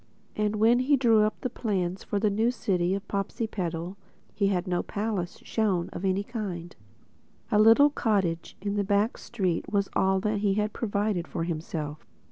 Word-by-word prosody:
And 210 Hz, 0 st, 0 dB
when 225 Hz, +3 st, +4 dB
he 275 Hz, +3 st, +3 dB
drew 230 Hz, -4 st, +4 dB
up 215 Hz, 0 st, 0 dB
the 255 Hz, -, -1 dB
plans 190 Hz, -6 st, -2 dB
for 205 Hz, -, -2 dB
the 210 Hz, 0 st, +2 dB, 0.2 s
City 185 Hz, -6 st, 0 dB
of 200 Hz, -, -4 dB
New -, -, -32 dB
Popsipetel 195 Hz, -4 st, -3 dB, 0.4 s
he 200 Hz, -, +1 dB
had 185 Hz, -2 st, 0 dB
no 180 Hz, -2 st, 0 dB
palace 205 Hz, -4 st, -3 dB
shown 195 Hz, -6 st, 0 dB
of -, -, -7 dB
any 195 Hz, +1 st, +1 dB
kind. 195 Hz, -7 st, -5 dB, 0.8 s
A 210 Hz, -, +4 dB
little 225 Hz, +7 st, +7 dB
cottage 190 Hz, -, -1 dB
in 205 Hz, +1 st, -1 dB
a -, -, +2 dB
back 205 Hz, +3 st, +1 dB
street 185 Hz, -7 st, -2 dB
was 200 Hz, -1 st, +1 dB
all 190 Hz, 0 st, +2 dB
that 210 Hz, +1 st, 0 dB
he 200 Hz, -1 st, +1 dB
had 210 Hz, 0 st, 0 dB
provided 205 Hz, -5 st, -1 dB
for 170 Hz, -, -3 dB
himself. 155 Hz, -2 st, -4 dB
200 Hz, 175 wpm, -27 LUFS, 180-215 Hz, 0.8 s, little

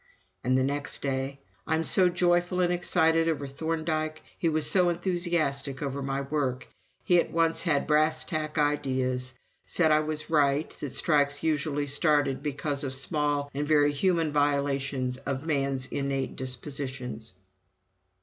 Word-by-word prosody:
And 130 Hz, +2 st, +2 dB
the 130 Hz, -, +2 dB
next 145 Hz, +3 st, -1 dB
day: 135 Hz, 0 st, -3 dB, 0.3 s
"I'm 160 Hz, +1 st, +1 dB
so 180 Hz, +2 st, +4 dB
joyful 175 Hz, 0 st, +1 dB
and 180 Hz, -1 st, +2 dB
excited 165 Hz, -2 st, +2 dB
over 145 Hz, -3 st, -2 dB
Thorndike. 155 Hz, +2 st, -3 dB
He 170 Hz, -, 0 dB
was 155 Hz, -1 st, +2 dB
so 180 Hz, -2 st, +4 dB
enthusiastic 170 Hz, -6 st, -1 dB
over 140 Hz, 0 st, -3 dB
my 135 Hz, 0 st, -2 dB
work.... 135 Hz, -3 st, -2 dB, 0.4 s
He 175 Hz, -3 st, +4 dB
at -, -, 0 dB
once 165 Hz, 0 st, +1 dB
had 150 Hz, -5 st, +1 dB
brass 155 Hz, +1 st, +2 dB
tack 155 Hz, -2 st, -3 dB
ideas. 130 Hz, -3 st, 0 dB, 0.3 s
Said 160 Hz, -3 st, +3 dB
I 155 Hz, -, +5 dB
was 155 Hz, 0 st, -2 dB
right 145 Hz, 0 st, +2 dB
that 140 Hz, -3 st, -5 dB
strikes 145 Hz, -1 st, +2 dB
usually 150 Hz, -2 st, 0 dB
started 145 Hz, -2 st, +2 dB
because 145 Hz, 0 st, -2 dB
of 130 Hz, -1 st, 0 dB
small 145 Hz, 0 st, -1 dB
and 145 Hz, +2 st, -2 dB
very 145 Hz, -1 st, +4 dB
human 165 Hz, +1 st, +1 dB
violations 140 Hz, -3 st, 0 dB
of 135 Hz, +2 st, -4 dB
man's 140 Hz, -4 st, 0 dB
innate 135 Hz, 0 st, -3 dB
dispositions." 130 Hz, -4 st, -4 dB
145 Hz, 145 wpm, -27 LUFS, 135-160 Hz, 0.4 s, I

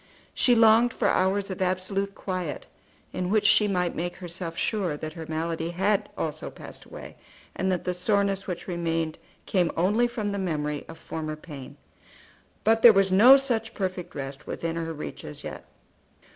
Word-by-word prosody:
She 245 Hz, -, +4 dB
longed 225 Hz, +1 st, +5 dB
for -, -, 0 dB
hours 195 Hz, +1 st, +1 dB
of 190 Hz, -, -5 dB
absolute 190 Hz, +2 st, -1 dB
quiet, 185 Hz, -7 st, -4 dB, 0.5 s
in 180 Hz, 0 st, -2 dB
which 210 Hz, 0 st, +2 dB
she 210 Hz, +1 st, +5 dB
might 180 Hz, -3 st, 0 dB
make 175 Hz, +2 st, -3 dB
herself 170 Hz, -2 st, -6 dB
sure 190 Hz, -9 st, -1 dB
that 155 Hz, +1 st, -6 dB
her 160 Hz, -1 st, -8 dB
malady 165 Hz, +1 st, -2 dB
had 200 Hz, +4 st, +1 dB
also 155 Hz, -1 st, -3 dB
passed -, -, -11 dB
away, -, -, -10 dB, 0.4 s
and 190 Hz, 0 st, 0 dB
that 180 Hz, -, -1 dB
the 180 Hz, -, -1 dB
soreness 195 Hz, +1 st, 0 dB
which 180 Hz, -2 st, -5 dB
remained 165 Hz, -3 st, -2 dB, 0.3 s
came 180 Hz, -4 st, +1 dB
only 210 Hz, +8 st, +3 dB
from 220 Hz, -4 st, -3 dB
the 200 Hz, -, -2 dB
memory 150 Hz, -5 st, -2 dB
of -, -, -10 dB
former 155 Hz, -1 st, -5 dB
pain. 150 Hz, -4 st, -10 dB, 0.9 s
But 225 Hz, +1 st, +3 dB
there 235 Hz, -, +10 dB
was 195 Hz, -1 st, +3 dB
no 240 Hz, +8 st, +9 dB
such 235 Hz, -5 st, -2 dB
perfect 185 Hz, -2 st, -4 dB
rest 135 Hz, -1 st, -6 dB
within 165 Hz, 0 st, -3 dB
her 165 Hz, -1 st, -3 dB
reach 150 Hz, -2 st, -7 dB
as -, -, -8 dB
yet. -, -, -7 dB
185 Hz, 170 wpm, -26 LUFS, 165-205 Hz, 0.9 s, there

